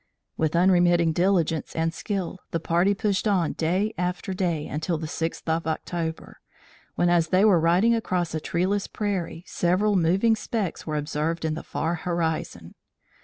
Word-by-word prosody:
With 160 0 0
unremitting 175 -2 +4
diligence 170 -3 +1
and 165 0 0
skill, 190 -1 -4
the 165 - -2
party 175 +5 +2
pushed 200 +1 0
on 185 -6 +1
day 185 +7 0
after 180 +2 -2
day 175 -5 -1
until 160 +3 -2
the 160 - -5
sixth 165 +2 -4
of 160 0 0
October, 160 0 -4 0.6
when, 175 - +2
as 175 -1 +3
they 185 +4 +3
were 195 -5 +5
riding 175 +8 +3
across 180 -7 -1
a 160 - -1
treeless 185 +6 -1
prairie, 190 -5 -3
several 190 +4 +1
moving 190 +6 +3
specks 215 -7 -3
were 155 - -2
observed 155 +3 -2
in 155 - 0
the 160 - -5
far 160 +4 -2
horizon. 160 - -3
175 Hz, 160 wpm, -25 LUFS, 160-190 Hz, 0.6 s, were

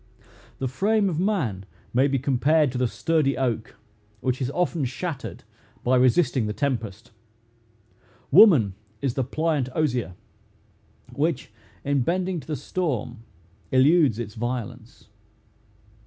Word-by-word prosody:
The 130 - -2
frame 200 - +1
of 165 -3 -2
man 155 - -1 0.3
may 130 +3 +4
be 135 -1 0
compared 140 +3 +2
to 125 - -4
the 125 - +2
sturdy 155 +1 0
oak, 120 -4 -2 0.4
which 130 +3 -2
is 130 - 0
often 170 0 -1
shattered 140 +4 -5 0.4
by 125 +1 +3
resisting 130 -1 +3
the 105 - -2
tempest. 115 -6 -3 1.2
Woman 150 - +7 0.3
is 135 -4 0
the 135 - -1
pliant 150 0 -1
osier, 125 - -1 1.0
which, 145 -6 -1 0.3
in 140 -1 +1
bending 180 +5 -1
to - - -13
the 155 - -2
storm, 125 -6 -3 0.5
eludes 140 - +4
its 110 -3 -5
violence. 120 0 -6
135 Hz, 125 wpm, -24 LUFS, 120-160 Hz, 1.2 s, Woman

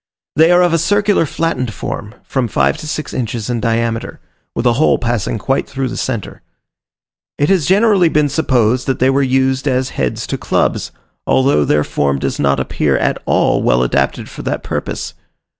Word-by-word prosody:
They 160 +3 +5
are 175 0 +5
of 175 -2 +2
a 165 - +3
circular 205 0 +2
flattened 130 -9 -2
form, 105 +2 -6
from 130 -3 -1
five - - +1
to 155 0 -8
six 155 0 -4
inches 115 -2 -3
in 120 - -1
diameter, 115 0 -1 0.4
with 115 - -2
a 120 - +4
hole - - +4
passing 120 -2 -1
quite 135 +5 -1
through 135 -1 -3
the - - -6
centre. 115 -6 -4 1.0
It 145 - +1
has 185 -7 +2
generally 195 -3 +4
been 150 -1 +2
supposed 130 -5 +1
that 135 - 0
they 130 +1 +3
were 140 +1 +2
used 130 +1 +1
as 130 -1 0
heads 65 -2 -2
to - - -4
clubs, - - 0 0.4
although 130 - +3
their 75 +1 +2
form 70 -2 0
does - - -3
not 70 -1 +2
appear - - 0
at - - -1
all - - +2
well 60 +1 +2
adapted 60 - 0
for - - -9
that - - -3
purpose. - - -4
130 Hz, 185 wpm, -16 LUFS, 115-155 Hz, 1.0 s, They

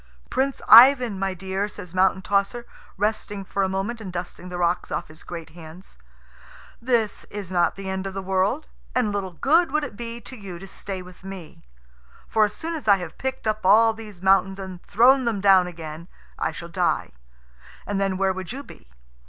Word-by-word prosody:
"Prince 270 +1 -1
Ivan, 245 -3 +8
my 195 -1 -1
dear," 190 +2 -2
says 195 -4 -10
Mountain 190 0 +2
tosser, 205 +5 0 0.3
resting 205 -1 -2
for 200 - -2
a 190 - +1
moment 200 +5 -3
and 190 -4 -6
dusting 180 0 -6
the 180 - -5
rocks 175 0 0
off 155 +2 -3
his 155 0 -13
great 165 -2 -8
hands, 160 - -13 0.8
"this 230 -4 0
is 200 -3 -7
not 175 -1 +2
the 195 0 -7
end 190 0 -3
of 195 - -7
the 195 - -3
world, 195 +10 0 0.3
and 245 -5 +2
little 195 -3 -3
good 320 - +3
would 305 +1 +1
it 275 - -6
be 235 +1 -6
to 250 +3 -11
you 195 -6 -8
to 190 - -10
stay 190 -1 -6
with 180 +1 -15
me. 190 -4 -9 0.7
For 220 -1 +3
as 210 0 -5
soon 330 +1 -4
as 310 -8 -6
I 200 - +7
have 175 -4 -8
picked 265 -2 -3
up 215 0 -1
all 220 +4 +6
these 210 -5 -11
mountains 195 0 +3
and 190 -2 -8
thrown 255 +5 +4
them 225 -4 0
down 190 -2 +5
again 165 -1 -8 0.3
I - - 0
shall - - -8
die, - - 0 0.7
and 200 -1 -2
then 195 -1 0
where 190 0 +2
would 185 0 -6
you 275 +3 -6
be? - - -16
195 Hz, 200 wpm, -24 LUFS, 185-225 Hz, 0.8 s, Ivan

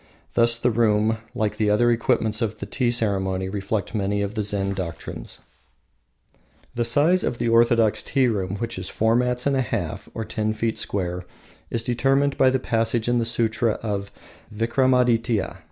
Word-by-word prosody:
Thus 115 0 +4
the 120 +1 +1
room, 110 -1 +2 0.2
like 110 -3 -1
the 105 -2 +1
other 120 +3 +3
equipments 115 -1 +1
of 110 -2 -1
the - - -6
tea 125 -3 0
ceremony, 95 -5 0
reflects 100 +2 -3
many 100 -1 0
of 100 +1 -3
the 110 - -1
Zen 100 -1 0
doctrines. 90 -4 -6 1.3
The 120 0 -1
size 155 +10 +3
of 120 - -1
the 115 - 0
orthodox 115 -1 +4
tea 135 -2 +1
room, 100 -4 -1
which 115 +3 -4
is - - -6
four 110 +1 +1
mats 125 0 0
and 140 -1 +2
a 130 - +2
half, 100 -3 -4
or 110 - -3
ten 110 0 -2
feet 110 0 -2
square, 90 -2 -3 0.4
is 115 -1 -2
determined 135 +4 +1
by 130 - +4
a 130 +1 +3
passage 115 -2 0
in 120 0 +2
the 115 - 0
Sutra 115 0 +1
of 100 -2 -3 0.4
Vikramadytia. 115 -3 +1
115 Hz, 170 wpm, -23 LUFS, 105-120 Hz, 1.3 s, Thus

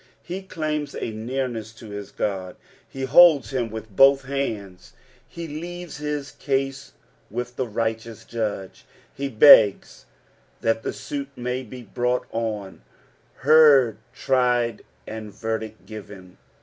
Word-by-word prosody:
Be 180 +3 -4
claims 155 -5 -3
a 115 - -4
neamesa 115 -1 -4
to 110 -2 -11
hia 100 -1 -6
God, 95 -3 -2 0.3
he 135 - -6
holds 140 -4 +6
him 120 -3 -1
with 110 -2 -9
both 135 +2 +6
hands; 110 -9 -4 0.4
he 170 -1 -7
leares 175 +3 -7
his 150 -1 -4
cuse 135 -1 -3 0.4
with 120 +2 -5
the 130 -1 -2
righteous 115 0 -3
Jud^. 105 -5 -4 0.3
He 140 - -3
begs 110 -4 +6 0.5
that 115 0 +1
the - - -3
suit 140 -1 -6
may 125 +1 -3
bu 125 0 -10
brought 125 +2 -1
on, 105 - -4 0.6
heard, 145 -7 +6
tried, 125 -3 +1 0.2
and 110 -1 -7
verdict 110 +1 -5
given. 100 -4 -11
120 Hz, 125 wpm, -24 LUFS, 110-140 Hz, 0.6 s, holds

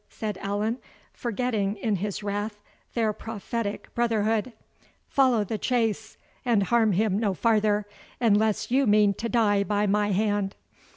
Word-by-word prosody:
said 215 -2 -4
Allan, 210 +4 -1 0.3
forgetting, 220 -4 -1
in 210 -1 -1
his 205 +2 -4
wrath, 205 +1 -3 0.4
their 225 -3 +1
prophetic 225 0 -5
brotherhood, 225 0 +1 0.6
"follow 255 -6 +3
the 210 +2 -4
chase, 225 -3 -1 0.3
and 230 -5 +2
harm 225 0 +3
him 205 +1 +1
no 205 -4 0
farther, 210 -2 +2 0.3
unless 220 -1 +2
you 270 0 +3
mean 205 -1 +5
to 230 +4 -4
die 205 -4 +3
by 205 0 0
my 205 +1 +1
hand." 205 0 0
215 Hz, 135 wpm, -26 LUFS, 205-230 Hz, 0.6 s, mean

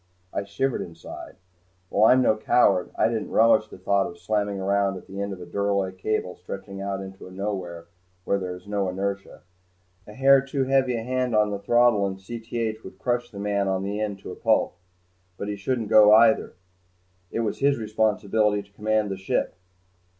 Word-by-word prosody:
I 100 - -2
shivered 115 +6 -1
inside. 85 -1 -9 0.5
While 110 +2 +4
I'm 130 0 +5
no 110 - +4
coward, 110 -3 +3
I - - +3
didn't 115 -2 -3
relish 110 -1 +4
the - - -12
thought 95 +1 +1
of 85 - -10
slamming 100 +2 -1
around 100 0 +1
at - - -12
the 100 +1 -6
end 100 0 -3
of 95 - -7
a 90 - -8
duralloy 100 -1 -1
cable 95 -1 -2
stretching 95 +2 -8
into 95 -1 -6
a - - -12
nowhere 95 -4 -5 0.4
where 100 - +1
there 90 -1 -4
was 90 0 -11
no 100 -2 -1
inertia. 100 +1 -4 0.6
A 105 - -10
hair 135 +3 +5
too 135 0 -2
heavy 130 -2 +2
a 115 - -4
hand 125 -1 -1
on 105 -1 +3
the 100 - -3
throttle 120 -2 +3
in 95 - -4
Cth 115 +2 -5
would 95 - -11
crush 120 +3 -1
the 100 - -12
man 100 0 0
on 95 0 0
the 100 +2 -3
end 105 -2 -2
to - - -8
a - - -7
pulp. - - +1 0.6
But 100 - -4
he 105 - -2
shouldn't 110 +2 -2
go 105 -1 +8
either. 110 0 +4 0.7
It 115 - -2
was 110 -3 -2
his 140 0 +3
responsibility 105 -1 +1
to 100 - -25
command 110 0 0
the 95 - -3
ship. 95 - -1
100 Hz, 195 wpm, -25 LUFS, 95-110 Hz, 0.7 s, go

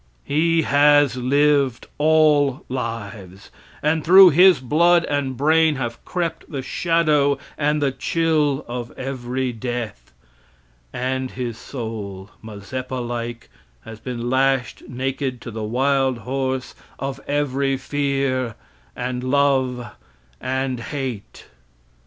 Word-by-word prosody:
He 165 +2 +2
has 145 -2 +4
lived 140 0 +2
all 150 -3 +3
lives, 105 -6 -6 0.3
and 155 +1 +1
through 185 +1 +8
his 180 0 +6
blood 170 +6 +3
and 140 -3 -2
brain 160 +2 +3
have 120 -3 -5
crept 170 -2 -3
the 135 -3 -4
shadow 150 -4 +2 0.2
and 150 0 0
the 140 - +2
chill 155 -2 0
of 120 0 -5
every 130 -1 -3
death, 115 - -5 0.8
and 130 +1 -2
his 120 -3 -5
soul, 105 -6 -7
Mazeppa 115 +5 -6
like, 120 -1 -5 0.3
has 110 -1 -9
been 120 -1 -5
lashed 130 0 +1
naked 130 0 -3
to 120 - -7
the 110 0 -5
wild 130 +3 +1
horse 130 +2 -3 0.2
of 135 0 -4
every 140 -1 0
fear 135 -3 -1 0.4
and 125 0 -3
love 130 -3 +1 0.5
and 130 -1 -2
hate. 130 -5 -6
130 Hz, 110 wpm, -21 LUFS, 120-145 Hz, 0.8 s, through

